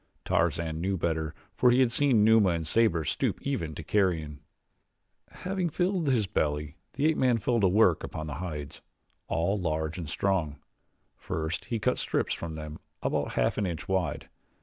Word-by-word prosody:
Tarzan 80 Hz, -1 st, 0 dB
knew 95 Hz, +2 st, 0 dB
better 80 Hz, -2 st, -2 dB, 0.2 s
for 125 Hz, -, +4 dB
he 125 Hz, +1 st, +4 dB
had 130 Hz, -3 st, +4 dB
seen 125 Hz, -4 st, +3 dB
Numa 110 Hz, -3 st, +5 dB
and 85 Hz, -2 st, -1 dB
Sabor 85 Hz, -2 st, +2 dB
stoop -, -, -1 dB
even 85 Hz, -, -2 dB
to 80 Hz, -, -6 dB
carrion. 80 Hz, -6 st, 0 dB, 0.9 s
Having 185 Hz, -1 st, -3 dB
filled 175 Hz, +1 st, 0 dB
his 120 Hz, -6 st, +2 dB
belly, 75 Hz, -3 st, -1 dB, 0.2 s
the 145 Hz, -, -1 dB
ape 160 Hz, 0 st, +3 dB
man 125 Hz, -2 st, +3 dB
fell 120 Hz, +2 st, +1 dB
to 100 Hz, -, +4 dB
work 95 Hz, -3 st, +4 dB
upon 80 Hz, -, -5 dB
the 75 Hz, -, -5 dB
hides 75 Hz, -6 st, -6 dB, 0.5 s
all 85 Hz, +6 st, 0 dB
large 80 Hz, -1 st, -2 dB
and 80 Hz, -4 st, -5 dB
strong. 85 Hz, -4 st, 0 dB, 0.6 s
First 80 Hz, +2 st, -4 dB
he 115 Hz, -, -2 dB
cut 125 Hz, +4 st, 0 dB
strips -, -, 0 dB
from 80 Hz, -2 st, -5 dB
them 75 Hz, 0 st, -7 dB, 0.2 s
about -, -, -1 dB
half -, -, +1 dB
an 100 Hz, -, 0 dB
inch 85 Hz, -3 st, -5 dB
wide. 95 Hz, -5 st, -1 dB
90 Hz, 170 wpm, -28 LUFS, 80-115 Hz, 0.9 s, Numa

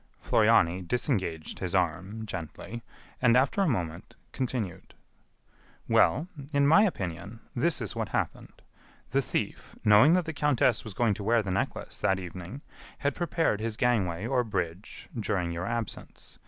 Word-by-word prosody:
Floriani 85 Hz, +3 st, +3 dB
disengaged 95 Hz, -, -2 dB
his 90 Hz, -1 st, -2 dB
arm 95 Hz, +5 st, -1 dB
gently, 95 Hz, +4 st, -6 dB, 0.4 s
and, 125 Hz, -1 st, +5 dB
after 135 Hz, +9 st, +2 dB
a 195 Hz, -, +3 dB
moment, 85 Hz, -, -3 dB, 0.2 s
continued: 120 Hz, -9 st, -4 dB, 0.9 s
"Well, 160 Hz, -, +3 dB, 0.2 s
in 140 Hz, -1 st, +3 dB
my 160 Hz, +8 st, +7 dB
opinion, 100 Hz, -, -4 dB, 0.2 s
this 145 Hz, +6 st, +1 dB
is 110 Hz, -, -4 dB
what -, -, -2 dB
happened. -, -, -3 dB, 0.5 s
The -, -, +3 dB
thief, -, -, -4 dB
knowing 110 Hz, +9 st, +7 dB
that 180 Hz, -2 st, +2 dB
the 160 Hz, -, -4 dB
countess 145 Hz, -5 st, +2 dB
was 105 Hz, -4 st, -8 dB
going 115 Hz, -1 st, +2 dB
to 100 Hz, -, -6 dB
wear 115 Hz, +1 st, +3 dB
the 95 Hz, -, -3 dB
necklace 95 Hz, -, -3 dB
that 95 Hz, -2 st, +2 dB
evening, 90 Hz, -, -7 dB, 0.4 s
had 140 Hz, 0 st, 0 dB
prepared 165 Hz, -9 st, 0 dB
his 110 Hz, -1 st, -2 dB
gangway 100 Hz, -7 st, +1 dB
or 125 Hz, 0 st, +1 dB
bridge 90 Hz, -3 st, -4 dB
during 95 Hz, -6 st, -1 dB
your 85 Hz, +3 st, -3 dB
absence. 115 Hz, -1 st, -6 dB
110 Hz, 150 wpm, -28 LUFS, 90-130 Hz, 0.9 s, my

